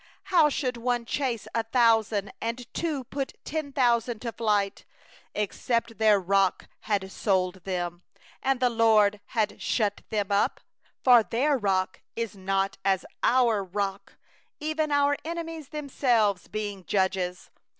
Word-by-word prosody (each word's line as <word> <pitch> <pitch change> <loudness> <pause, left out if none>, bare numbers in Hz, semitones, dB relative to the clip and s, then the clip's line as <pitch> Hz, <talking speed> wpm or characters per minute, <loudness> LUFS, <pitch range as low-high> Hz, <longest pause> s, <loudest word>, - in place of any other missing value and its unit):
30How 325 -5 +6
should 255 -3 -1
one 240 0 -1
chase 245 -3 -2
a 230 - +2
thousand, 225 -3 +2
And 235 +2 -3
two 310 -6 -2
put 270 +2 -4
ten 310 -2 -3
thousand 240 -3 +2
to 235 - -2
flight, 210 -4 0 0.5
Except 230 +2 -1
their 215 -2 +5
Rock 195 0 +1 0.2
had 205 -2 +2
given 190 -1 -1
them 175 -2 -2
over 175 - -26 0.4
And 270 -1 +1
the 250 -1 +3
LORD 215 -3 +4
had 220 -3 +1
delivered 210 -3 0
them 205 -2 -1
up? 200 - +2 0.5
31For 245 -4 +6
their 280 +6 +2
rock 190 -5 0
is 230 -3 -3
not 195 +1 -1
as 190 -1 +1 0.2
our 235 -5 +3
Rock, 195 +1 -4 0.4
Even 310 0 -1
our 285 0 +3
enemies 330 -2 -5
themselves 245 - +1
being 205 -3 -4
judges. 190 -2 -1
225 Hz, 140 wpm, -27 LUFS, 195-255 Hz, 0.5 s, 30How